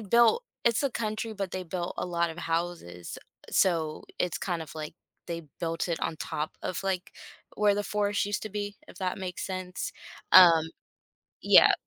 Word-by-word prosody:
built 235 - +4 0.2
it's 235 +3 +3
a 275 - +1
country, 220 0 -2
but 195 -3 -3
they 185 - -3
built 175 0 -3
a - - -2
lot 170 -1 0
of 160 - -9
houses. 165 - -3 0.3
So 165 -4 +2 0.2
it's 180 - 0
kind 175 -3 -2
of, 155 - -10
like, 155 -1 -5 0.3
they 170 -1 -4 0.2
built 165 +1 -2
it 165 - 0
on - - -1
top 150 0 -3
of, 180 - -3
like, 190 -1 -1 0.5
where 205 -1 +4
the 205 - 0
forest 205 0 0
used 205 0 -2
to 215 - -4
be, 205 -1 -4
if - - -14
that 185 0 -2
makes 180 -2 -4
sense. 185 -1 -4 0.4
Um 170 -4 +9 0.8
Yeah. - - +8
185 Hz, 175 wpm, -29 LUFS, 170-205 Hz, 0.8 s, Um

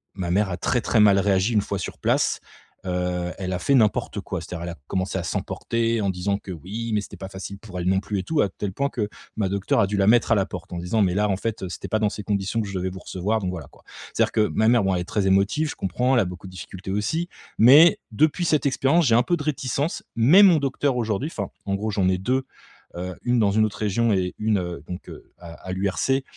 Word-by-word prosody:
ma 90 -3 -3
mère 100 +2 +2
a 90 - -3
très 120 +7 0
très 115 - +1
mal 100 -2 +6
réagi 100 +3 +2
une 105 - +3
fois 100 - -3
sur 90 - -6
place, - - +1 0.5
heu, 90 -1 -2
elle 95 -1 -3
a 90 - -2
fait 140 - +1
n'importe 110 -5 +1
quoi. - - -4
C'est-à-dire, 85 -1 -7
elle 85 - -4
a - - -10
commencé 95 0 -2
à 85 - -4
s'emporter, 115 +5 -1
en 100 - 0
disant 95 +2 -1
que: 95 - -9
«Oui, 105 +8 -5
mais 105 - +2
c'était - - -10
pas 95 - -7
facile 95 +1 -7
pour 95 -4 -8
elle 85 - -3
non 95 0 +3
plus 100 0 -3
et 95 - -3
tout,» 160 -2 +1
à 100 - +1
tel 100 -2 -5
point 140 +4 0
que 105 -7 -3 0.3
ma 100 -3 0
docteure 100 -1 0
a 100 - +3
dû 100 0 -2
la 95 - +2
mettre 115 +1 +4
à 115 - +6
la 95 - +2
porte. 90 -2 -8
En - - -4
disant: 90 +6 0
«Mais 90 -2 +1
là 105 +1 +2
en 95 - +2
fait, 110 -1 -4
heu, 95 - -4
c'était - - -6
pas 110 - +1
dans 105 -1 +2
ces 105 - -7
conditions 100 +2 -1
que 105 - -4
je 95 - -6
devais 95 +1 -2
vous 95 0 -8
recevoir, 100 +6 -2
donc 95 - -2
voilà 85 -5 -7
quoi». - - -22 0.3
C'est-à-dire - - +2
que 110 -1 +2
ma 110 - +1
mère, 120 -3 +4
bon, 95 -1 +1
elle 90 - -1
est - - -5
très 100 +1 -1
émotive, 100 +11 +2
je - - -8
comprends, 125 +8 0
elle - - +5
a - - 0
beaucoup 90 +1 -8
de - - -11
difficultés 95 +1 -8
aussi, 125 - -1 0.3
mais 145 +8 +8
depuis 155 +9 +2
cette 155 -3 +2
expérience, 140 +5 +2
j'ai 115 - +4
un 120 - +5
peu 175 +7 0
de 145 - -5
réticence. 145 +1 -2
Mais 135 - +6
mon 185 -5 +7
docteur 140 -1 0
aujourd'hui, 115 +5 -1
enfin 100 -2 -3 0.2
en 100 - 0
gros, 105 +2 -2
j'en 100 -3 +1
ai 95 - +1
2, 130 +7 0 0.5
heu, 90 +1 -5
une 120 0 +2
dans 105 -3 +3
une 110 +2 +3
autre 105 - -5
région 110 +2 +1
et 90 -2 0
une, 105 -2 +1
heu, 85 -4 -5
donc, 90 0 -7
heu, - - -13
à 85 -1 -10
à 90 - -8
l'URC 100 +8 0
100 Hz, 275 wpm, -24 LUFS, 95-115 Hz, 0.5 s, mais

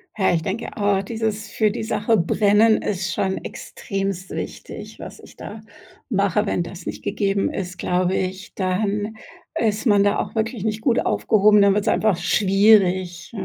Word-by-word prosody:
Ja, 190 -4 +2
ich 165 - +1
denke 200 +6 -4
auch, 200 -2 +1
dieses: 220 -1 -3
Für 215 -1 +2
die 220 - -4
Sache 220 0 +1
brennen 210 +5 +3
ist 190 -2 -2
schon 190 +2 -1
extremst 195 -3 -5
wichtig, - - -7
was - - -9
ich - - -15
da 215 +1 -9 0.5
mache. 200 -1 +1
Wenn 180 - -1
das 170 0 -10
nicht - - -6
gegeben 195 -1 0
ist, 180 -2 -5
glaube 180 +1 0
ich, 185 0 -4
dann 205 +3 -1 0.4
ist 220 +1 0
man 205 -4 +4
da 205 - +2
auch - - -4
wirklich 225 -1 -2
nicht 215 0 -2
gut 235 -1 +2
aufgehoben, 210 0 +4
dann 200 0 +5
wird's 205 0 -1
einfach 210 -5 +2
schwierig. 190 -2 +2
200 Hz, 165 wpm, -22 LUFS, 190-215 Hz, 0.5 s, dann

